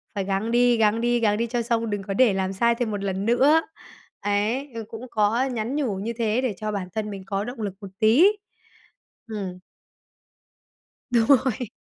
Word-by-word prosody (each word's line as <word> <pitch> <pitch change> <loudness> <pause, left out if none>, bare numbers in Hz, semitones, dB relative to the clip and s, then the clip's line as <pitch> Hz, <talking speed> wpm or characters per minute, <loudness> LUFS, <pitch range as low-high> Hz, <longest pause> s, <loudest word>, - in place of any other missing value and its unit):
phải 195 - -1
gắng 195 +4 -1
đi, 240 0 +4
gắng 220 +1 +2
đi, 240 0 +2
gắng 210 -2 +2
đi 235 - -1
cho 240 +1 -1
xong, 230 -1 -1
đừng 205 -1 -3
có 195 - -4
để 230 -1 +4
làm 190 0 -1
sai 235 +4 +2
thêm 235 -2 -2
một 200 -1 -3
lần 195 0 -2
nữa. 275 +7 +4 0.6
Ấy, 210 +7 0
ờ, 225 - -4
cũng 225 +1 -8
có 220 +4 +2
nhắn 245 0 -3
nhủ 260 -10 -1
như 220 +5 -4
thế 230 +2 +1
để 250 -5 -1
cho 215 +2 -3
bản 195 -3 -3
thân 215 -1 -2
mình 195 -2 -7
có 195 +1 -2
động 245 0 -7
lực 200 -3 -3
một 195 - -8
tí. 225 +9 +5 1.0
Ừm. 195 -4 -5 1.5
Đúng 235 -2 +3 0.2
rồi. 245 -2 -2
220 Hz, 200 wpm, -24 LUFS, 205-240 Hz, 1.5 s, tí